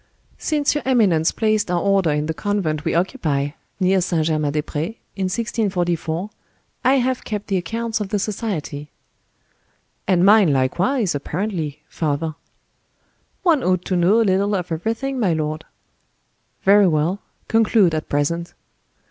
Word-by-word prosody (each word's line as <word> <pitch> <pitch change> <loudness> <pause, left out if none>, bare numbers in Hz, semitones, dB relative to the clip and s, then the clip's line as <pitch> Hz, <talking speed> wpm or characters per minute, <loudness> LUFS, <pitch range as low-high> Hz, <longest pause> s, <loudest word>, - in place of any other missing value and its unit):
"Since 295 -2 +1
your 295 - -1
eminence 200 -11 +3
placed 215 -3 0
our 175 -1 +1
order 195 -2 +2
in 150 0 0
the 160 - -2
convent 165 -6 -1
we - - 0
occupy, 150 -5 0 0.3
near 190 0 +3
St. 170 -3 0
Germain 155 -2 0
des 150 0 -1
Pres, 160 +11 -4 0.2
in 195 -1 -1
1644, 185 -5 -1 0.6
I 260 +2 +4
have 255 -1 0
kept 210 -2 -4
the 195 - 0
accounts 225 +6 -2
of 200 - -3
the 210 - 0
society." 190 -8 -4 1.2
"And 185 -1 +3
mine 205 -5 +6
likewise, 180 - +1
apparently, 155 -1 -3
father." 155 0 -2 1.1
"One 330 -6 +4
ought 185 -1 +1
to 185 - -1
know 180 +6 +4
a - - +4
little 200 +1 +2
of 180 -2 -3
everything, 230 +10 -2
my 195 -7 +2
lord." 155 0 -3 1.0
"Very 200 0 +6
well. 165 +4 +1 0.3
Conclude, 220 -5 +3
at 155 - -3
present." 170 +4 -1
185 Hz, 145 wpm, -21 LUFS, 160-215 Hz, 1.2 s, mine